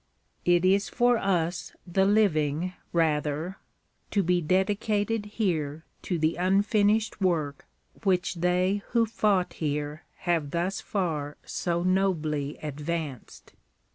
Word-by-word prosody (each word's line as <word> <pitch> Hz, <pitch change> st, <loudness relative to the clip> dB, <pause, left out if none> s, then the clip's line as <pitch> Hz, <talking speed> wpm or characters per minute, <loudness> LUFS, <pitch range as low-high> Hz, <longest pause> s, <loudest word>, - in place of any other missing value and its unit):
It 175 Hz, 0 st, +4 dB
is 195 Hz, +2 st, +3 dB
for 245 Hz, -2 st, +3 dB
us 175 Hz, -3 st, -1 dB
the 190 Hz, +2 st, +2 dB
living, 180 Hz, -5 st, +2 dB, 0.2 s
rather, 160 Hz, +2 st, 0 dB, 0.5 s
to 200 Hz, -, +1 dB
be 180 Hz, 0 st, +2 dB
dedicated 205 Hz, +4 st, 0 dB
here 160 Hz, -8 st, -2 dB, 0.2 s
to 180 Hz, -, -2 dB
the 160 Hz, +1 st, +1 dB
unfinished 205 Hz, +4 st, +2 dB
work 155 Hz, -7 st, 0 dB, 0.4 s
which 185 Hz, -3 st, +1 dB
they 180 Hz, +3 st, +1 dB
who 230 Hz, -1 st, +4 dB
fought 205 Hz, -4 st, +1 dB
here 150 Hz, 0 st, -3 dB, 0.2 s
have 165 Hz, -5 st, 0 dB
thus 175 Hz, +5 st, -1 dB
far 155 Hz, -7 st, -2 dB
so 170 Hz, -1 st, -1 dB
nobly 160 Hz, -6 st, 0 dB
advanced. 150 Hz, -2 st, -5 dB
180 Hz, 110 wpm, -27 LUFS, 155-195 Hz, 0.5 s, It